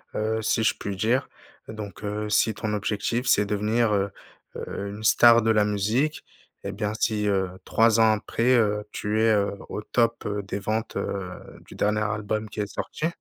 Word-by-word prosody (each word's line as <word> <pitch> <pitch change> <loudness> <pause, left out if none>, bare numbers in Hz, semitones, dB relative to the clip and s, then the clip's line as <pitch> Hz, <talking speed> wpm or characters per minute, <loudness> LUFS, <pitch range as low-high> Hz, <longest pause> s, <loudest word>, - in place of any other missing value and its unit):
heu, 110 +1 -1
si 110 +1 +1
je 110 - +3
puis 100 -1 -4
dire 115 +6 +1 0.4
donc 105 -3 -8
heu, 105 +1 -3
si 110 +1 +3
ton 105 +1 -3
objectif, 105 +4 -1
c'est 105 -3 +4
devenir, 105 +2 +1
heu 100 0 +1 0.5
heu, 100 - -5
une 105 +2 -8
star 115 +1 +6
de 110 0 +2
la 105 -1 +3
musique 110 +9 0 0.4
et 100 - -4
bien, 105 +1 -2
si, 105 -2 0
heu, 95 -2 +1 0.2
3 115 0 +3
ans 110 -1 +6
après, 115 +3 +1
heu, 105 -2 +2
tu 105 +1 -1
es, 115 0 +4
heu, 100 -1 +1 0.2
au 105 - -4
top, 115 +1 0
heu, 105 0 -2
des 100 +1 -4
ventes, 110 +2 -3
heu, 95 -2 -3 0.4
du - - -12
dernier 105 +1 +1
album 105 0 -2
qui 105 - -4
est 100 - -2
sorti 160 - -3
105 Hz, 190 wpm, -25 LUFS, 105-110 Hz, 0.5 s, star